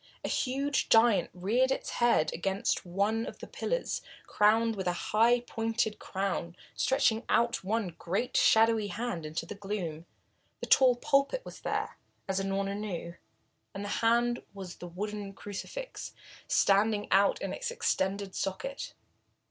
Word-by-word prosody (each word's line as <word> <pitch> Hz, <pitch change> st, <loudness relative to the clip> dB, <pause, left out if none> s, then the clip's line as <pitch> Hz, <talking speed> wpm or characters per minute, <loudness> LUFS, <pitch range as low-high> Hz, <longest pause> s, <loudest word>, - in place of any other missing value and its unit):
A -, -, -2 dB
huge 275 Hz, +2 st, 0 dB
giant 225 Hz, -2 st, +5 dB
reared 220 Hz, +9 st, +1 dB
his 265 Hz, -, -2 dB
height 235 Hz, -10 st, +2 dB
against 190 Hz, +1 st, -1 dB
one 205 Hz, +5 st, 0 dB
of -, -, -7 dB
the -, -, -8 dB
pillars, -, -, -2 dB, 0.2 s
crowned 225 Hz, +2 st, +3 dB
with 190 Hz, -2 st, -3 dB
a 175 Hz, -, +2 dB, 0.2 s
high, 235 Hz, +3 st, +5 dB
pointed 225 Hz, -2 st, -1 dB
crown, 190 Hz, -3 st, -3 dB, 0.2 s
stretching 265 Hz, -5 st, +2 dB
out 235 Hz, -2 st, +2 dB
one 210 Hz, 0 st, -1 dB
great 195 Hz, +8 st, -2 dB
shadowy 225 Hz, -1 st, +4 dB
hand 205 Hz, -8 st, -4 dB
into 160 Hz, +2 st, -4 dB
the 165 Hz, -, -7 dB
gloom 195 Hz, -6 st, -5 dB, 0.5 s
the -, -, -4 dB
tall 255 Hz, -2 st, +6 dB
pulpit 280 Hz, -, +1 dB
was -, -, -9 dB
there, -, -, -3 dB, 0.3 s
as 195 Hz, 0 st, 0 dB
Unorna 195 Hz, 0 st, -1 dB
knew, 190 Hz, -5 st, -5 dB, 0.6 s
and 200 Hz, +1 st, -4 dB
the -, -, -4 dB
hand 240 Hz, +1 st, +2 dB
was 190 Hz, -3 st, -8 dB
the 175 Hz, -, -8 dB
wooden 200 Hz, +3 st, -5 dB
crucifix 355 Hz, -, -7 dB, 0.3 s
standing 205 Hz, +1 st, +3 dB
out 200 Hz, -, +4 dB
in -, -, -3 dB
its -, -, -3 dB
extended 200 Hz, -, -1 dB
socket. 195 Hz, +9 st, -4 dB
210 Hz, 145 wpm, -30 LUFS, 195-240 Hz, 0.6 s, tall